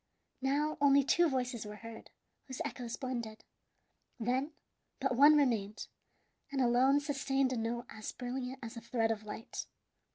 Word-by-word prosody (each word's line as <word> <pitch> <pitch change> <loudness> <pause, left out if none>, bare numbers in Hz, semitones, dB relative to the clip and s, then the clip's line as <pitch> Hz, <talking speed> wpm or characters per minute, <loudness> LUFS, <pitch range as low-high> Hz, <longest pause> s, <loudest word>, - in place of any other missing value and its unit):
Now 295 +4 0
only 280 0 +6
two 340 +5 +4
voices 250 -4 -2
were 210 0 -7
heard, 225 +1 -10 0.4
whose 260 -2 -6
echoes 240 -2 -5
blended. 235 -5 -4 0.8
Then 255 +6 0 0.5
but 265 -2 0
one 290 +4 +8
remained, 220 -8 +1 0.7
and 275 - -1
alone 255 +3 +4
sustained 275 -2 0
a - - -1
note 235 +2 -2
as 215 -1 -6
brilliant 250 +1 -4
as 225 +2 -6
a 230 - -7
thread 225 -1 0
of 215 -1 -3
light. 215 +1 -6
250 Hz, 150 wpm, -33 LUFS, 230-275 Hz, 0.8 s, one